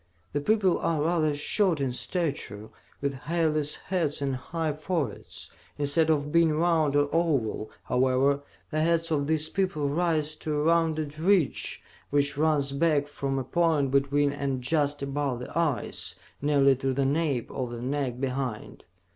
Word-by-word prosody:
The 145 - 0
people 195 +1 +2
are 160 -2 0
rather 155 -2 +1
short 170 +3 +2
in 135 -2 0
stature, 125 - -3 0.3
with 140 0 0 0.2
hairless 155 -3 +1
heads 170 -6 -2
and 140 -2 -1
high 160 +4 -3
foreheads. 155 - -4 0.3
Instead 145 +3 +2
of 150 -2 +1
being 165 -1 +4
round 160 -3 +2
or 145 0 +3
oval, 140 -10 0
however, 130 +2 +2 0.3
the 155 - 0
heads 165 0 +1
of 145 -2 +1
these 155 0 +2
people 170 -5 -1
rise 155 -1 0
to 155 -1 -3
a 150 - 0
rounded 155 -2 +1
ridge 180 -3 +1 0.3
which 140 0 +1
runs 145 -2 +1
back 145 0 +2
from 140 -2 -3
a 135 - -1
point 155 -2 +1
between 140 +1 +2
and 135 -3 -2
just 145 0 +1
above 140 -3 -2
the 125 - -8
eyes, 165 -6 -1 0.3
nearly 140 -2 +4
to 135 0 -1
the 140 0 +1
nape 140 -3 0
of 130 -2 -3
the 120 0 -6
neck 130 -2 -2
behind. 130 -4 -4
145 Hz, 155 wpm, -27 LUFS, 140-160 Hz, 0.3 s, being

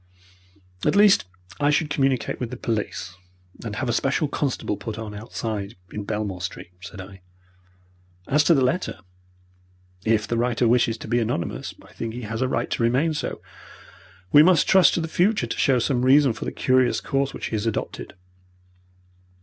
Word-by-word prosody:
"At - - +2
least, 205 - +6 0.3
I 145 0 +3
should 150 0 +1
communicate 135 -3 0
with 125 - -3
the 125 - -7
police, 105 -6 -3 0.5
and 110 -2 -5
have 130 - -2
a 120 - 0
special 140 +5 +1
constable 140 -6 -2
put 110 +1 -6
on 110 -2 -6
outside 105 -1 -5 0.2
in 105 -1 -5
Belmore 105 -4 -3
Street," 90 -1 -6
said 100 +1 -10
I. 95 0 -10 1.1
"As 150 +2 +3
to 170 - +5
the 135 - +3
letter, 130 - -1 1.0
if 110 -1 +1
the 115 - -1
writer 120 0 +1
wishes 115 -1 +2
to - - -9
be 120 +2 +1
anonymous, 110 -7 -3
I - - -18
think 115 0 -5
he 125 - -6
has 110 +2 -4
a 130 - +2
right - - -2
to - - -1
remain 130 +8 +2
so. 150 - -4 0.9
We 145 - +8
must 175 -1 +5
trust 190 -2 +5
to 170 - 0
the 165 - -3
future 195 +7 +1
to - - -5
show 135 -2 +3
some 125 +1 0
reason 135 -1 +5
for 110 - -7
the - - -3
curious 130 -1 +2
course 135 -1 -1
which - - -5
he - - -1
has 110 +1 -2
adopted." 80 - -4
120 Hz, 180 wpm, -24 LUFS, 110-140 Hz, 1.1 s, We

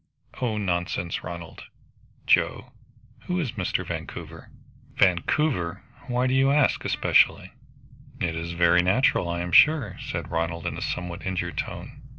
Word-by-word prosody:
"Oh, 115 -4 0
nonsense, 90 -3 -2
Ronald!" 85 -1 -8 0.6
"Joe - - +2 0.5
who 180 0 -1
is 140 -9 -2
Mr. 95 -7 -2
Vancouver?" - - -7 0.5
"Vancouver! 90 - +1 0.2
Why 125 0 0
do 130 - +1
you 135 +1 +4
ask 145 -1 +3
especially?" - - +2 0.7
"It 80 -1 -1
is 85 +1 -4
very 85 +1 +4
natural, 95 -1 +2
I 85 0 -2
am 90 0 -4
sure," 140 - +5
said - - -5
Ronald 85 0 -2
in - - -2
a - - -6
somewhat 90 -1 -4
injured 90 -2 -3
tone. - - -6
90 Hz, 140 wpm, -25 LUFS, 85-125 Hz, 0.7 s, sure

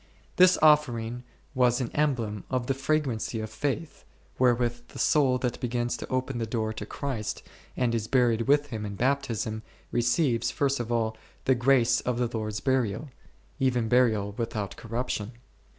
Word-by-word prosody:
His 185 0 +6
offering 125 -6 +3 0.3
was 125 -2 +3
an 125 -3 -3
emblem 120 -9 -1
of 130 -2 -1
the 135 - +1
fragrancy 135 -5 -1
of 110 0 -5
faith, 145 +3 -3 0.4
wherewith 120 -1 +1
the - - -12
soul 135 -4 +3
that 125 -1 -2
begins 120 0 -1
to - - -7
open 130 -1 -1
the 115 - -2
door 110 -1 -2
to - - -7
Christ 130 -7 -4 0.3
and 120 -2 +1
is 110 -2 -1
buried 120 -3 +2
with 145 +1 +3
Him 110 -2 -4
in 100 -1 -5
Baptism, 115 -3 -1 0.3
receives, 120 -1 +1
first 140 +2 0
of 120 -1 -4
all, 110 -2 0 0.3
the 130 - +5
grace 120 -1 +3
of 125 -1 -1
the 120 -1 -1
Lord's 110 -1 -3
burial; 130 +1 0 0.5
even 125 -4 +1
burial 110 -4 +3
without 110 -5 -3
corruption. 115 -1 -4
120 Hz, 160 wpm, -27 LUFS, 115-130 Hz, 0.5 s, His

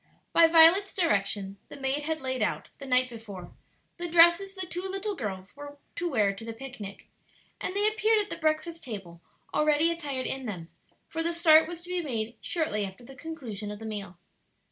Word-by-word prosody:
By 335 -1 +7
Violet's 335 +5 +6
direction 200 - 0
the - - -10
maid 270 +2 0
had 315 0 -3
laid 260 -2 -2
out, 210 - -1
the 275 - -8
night 255 0 +4
before, 210 -7 -9 0.5
the 345 0 -4
dresses 345 +4 +5
the 375 -1 -3
two 355 0 -4
little 390 +2 -3
girls 195 - -6
were 290 0 -10 0.2
to 345 0 -2
wear 210 -8 +2
to 195 - -10
the 230 0 -6
picnic, 225 -5 -8 0.6
and 370 - -3
they 410 +1 +3
appeared 435 +1 +3
at 415 -1 -3
the - - -3
breakfast 315 +1 -1
table 190 -8 -7 0.3
already 305 +2 +3
attired 285 -6 -4
in 265 -2 -2
them; 175 -5 -6 0.4
for 325 - -3
the 335 +1 0
start 320 -2 +6
was 340 0 -7
to 355 - -11
be 360 -1 0
made 235 -6 -3
shortly 310 -12 -1
after 195 +4 -7
the 270 - -12
conclusion 250 -10 -6
of 210 - -6
the 225 - -9
meal. 200 -5 -5
285 Hz, 195 wpm, -28 LUFS, 215-335 Hz, 0.6 s, By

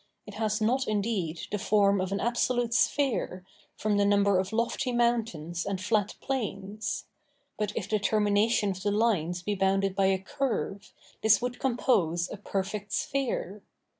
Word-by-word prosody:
It 210 - -10
has 215 0 -1
not 250 +5 +1
indeed 200 -6 -1
the 210 - -1
form 200 -1 +3
of 185 0 -3
an 200 - -1
absolute 240 +1 0
sphere, 240 -9 +1 0.3
from 210 -1 +1
the 205 - +4
number 200 -1 +3
of 190 +1 -2
lofty 235 +4 0
mountains 225 -9 0
and 200 -2 -3
flat 205 +1 0
plains; 215 -5 -3 0.5
but 210 -1 -2
if 200 - -2
the 215 0 +1
termination 210 +1 +2
of 190 0 -6
the 205 - 0
lines 190 -5 +1
be 210 - -1
bounded 195 0 +1
by 195 -1 +3
a 190 0 +3
curve, 205 -1 -3 0.3
this 220 -1 +5
would 245 0 -4
compose 185 -10 +1
a - - -5
perfect 200 0 -4
sphere. 235 -7 -2
205 Hz, 160 wpm, -28 LUFS, 195-230 Hz, 0.5 s, this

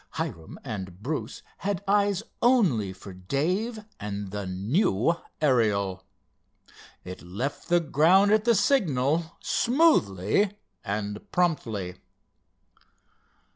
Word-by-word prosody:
Hiram 80 -1 -5
and 95 -6 -7
Bruce 150 +4 -4
had 200 -1 -3
eyes 200 0 +2 0.2
only 185 - +3
for 95 +1 -11
Dave 180 - -2
and 100 -2 -5
the 100 -1 -4
new 105 - +1 0.3
Ariel. 100 -9 +1 1.0
It 90 0 -8
left 105 - -5
the 175 0 +5
ground 170 +7 +4
at 215 0 +4
the 235 0 +4
signal, 165 - +1
smoothly 205 - +2 0.3
and 105 0 -3
promptly. 110 - -1
135 Hz, 95 wpm, -26 LUFS, -, 1.0 s, the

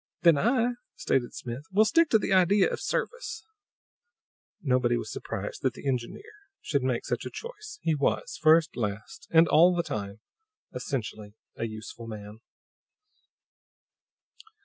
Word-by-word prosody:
"Then 170 -3 +6
I," 235 - +2 0.3
stated 120 -2 -1
Smith, 125 +4 -6
"will 210 +3 +5
stick 330 +9 +4
to 220 - +5
the 205 - -1
idea 190 +2 +5
of - - -4
service." 485 -1 -3 1.1
Nobody 125 -4 +2
was 115 -2 -5
surprised 105 -3 -5
that 130 -2 0
the - - -7
engineer 125 - -2 0.4
should 140 -3 -1
make 125 -2 -1
such - - -2
a - - -5
choice; 430 -3 -9
he 160 - +2
was, 145 -2 0
first, 160 +1 +5
last, 110 - -5
and 165 +1 +6
all 175 +4 +6
the 170 - +1
time, 100 -6 -5 0.5
essentially 110 -5 -5 0.2
a - - -3
useful 110 +1 -8
man. 105 -1 -8
140 Hz, 140 wpm, -28 LUFS, 115-185 Hz, 1.1 s, Then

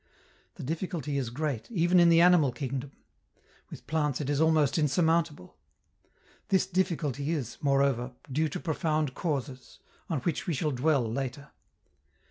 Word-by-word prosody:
The - - -8
difficulty 155 -1 -3
is 125 -4 -3
great, 140 -2 -3
even 180 -4 +3
in 170 -1 +6
the 165 0 +6
animal 175 -6 +5
kingdom; 130 +2 -4 0.8
with - - -11
plants 150 -4 0
it 145 -1 -2
is 145 +1 +1
almost 160 -2 +3
insurmountable. 160 - 0 0.9
This 190 - +2
difficulty 165 -7 -1
is, 140 -8 -3
moreover, 135 -4 +1 0.2
due 155 +4 +1
to - - -5
profound 155 -1 -1
causes, 135 -6 -4 0.3
on 155 -7 -1
which 165 +3 -2
we 170 - 0
shall 150 +2 -1
dwell 140 +1 +2
later. 135 +4 -5
150 Hz, 140 wpm, -29 LUFS, 135-165 Hz, 0.9 s, in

